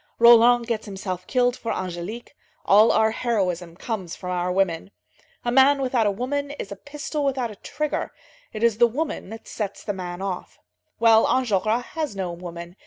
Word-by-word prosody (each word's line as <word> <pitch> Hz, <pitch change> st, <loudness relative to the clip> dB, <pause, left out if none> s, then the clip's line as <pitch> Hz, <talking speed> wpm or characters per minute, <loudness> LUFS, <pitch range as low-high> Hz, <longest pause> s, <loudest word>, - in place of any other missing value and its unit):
Roland 235 Hz, +1 st, +7 dB
gets 230 Hz, -2 st, -3 dB
himself 190 Hz, -2 st, -5 dB
killed 245 Hz, -1 st, +2 dB
for 230 Hz, -, -4 dB
Angélique; 185 Hz, +6 st, -5 dB, 0.4 s
all 210 Hz, +3 st, +6 dB
our 220 Hz, 0 st, +3 dB
heroism 185 Hz, -8 st, -1 dB
comes 190 Hz, -4 st, -5 dB
from 180 Hz, -1 st, -6 dB
our 180 Hz, 0 st, -1 dB
women. 180 Hz, -2 st, 0 dB, 0.6 s
A 240 Hz, -, +1 dB
man 270 Hz, +3 st, +5 dB
without 250 Hz, -4 st, +1 dB
a -, -, +2 dB
woman 280 Hz, +7 st, -2 dB
is 285 Hz, -8 st, -7 dB
a -, -, -4 dB
pistol 295 Hz, +3 st, -5 dB
without 260 Hz, -4 st, -1 dB
a -, -, -10 dB
trigger; 300 Hz, +7 st, -3 dB, 0.4 s
it 215 Hz, 0 st, -5 dB
is 230 Hz, -2 st, +3 dB
the 240 Hz, -, +7 dB
woman 290 Hz, 0 st, -4 dB
that 225 Hz, +1 st, -10 dB
sets 205 Hz, -3 st, -5 dB
the 205 Hz, -, -2 dB
man 180 Hz, -2 st, -6 dB
off. 190 Hz, -2 st, -5 dB, 0.4 s
Well, 225 Hz, -1 st, +5 dB
Enjolras 230 Hz, -1 st, +1 dB
has 310 Hz, -9 st, -3 dB
no 185 Hz, -3 st, -3 dB
woman. 170 Hz, +1 st, -8 dB
220 Hz, 175 wpm, -24 LUFS, 185-245 Hz, 0.6 s, Roland